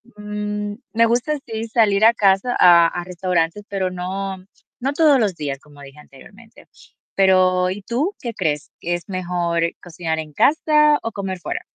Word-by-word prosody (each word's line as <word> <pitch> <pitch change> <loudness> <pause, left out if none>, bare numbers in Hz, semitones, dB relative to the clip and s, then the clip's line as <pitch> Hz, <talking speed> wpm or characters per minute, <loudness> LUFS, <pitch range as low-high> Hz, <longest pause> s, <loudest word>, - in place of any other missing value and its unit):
mm, 210 0 -4 0.2
me 230 +1 +4
gusta, 250 +6 0
sí, 225 0 -4
salir 215 -2 +3
a 230 - +7
casa 200 +3 +2
a 170 -2 +7
a 175 +1 -4
restaurantes, 180 +1 -2
pero 190 -2 -2
no 185 +1 -5 0.4
no 275 +2 -1
todos 295 -3 +4
los 205 -6 0
días, 140 -3 -4
como 145 -1 -17
dije 135 +1 -13
anteriormente. 205 +12 -17 0.5
Pero, 185 -1 +3
¿y 205 +2 -6
tú, 270 - -2
qué 235 -2 -5
crees? 150 -5 -2
¿Que 175 - -3
es 175 - -8
mejor 175 -2 -1 0.2
cocinar 165 -2 -4
en 155 -1 -7
casa, 300 - +3
o 230 - -4
comer 195 -3 -5
fuera? 355 - -4
195 Hz, 170 wpm, -20 LUFS, 175-225 Hz, 0.5 s, a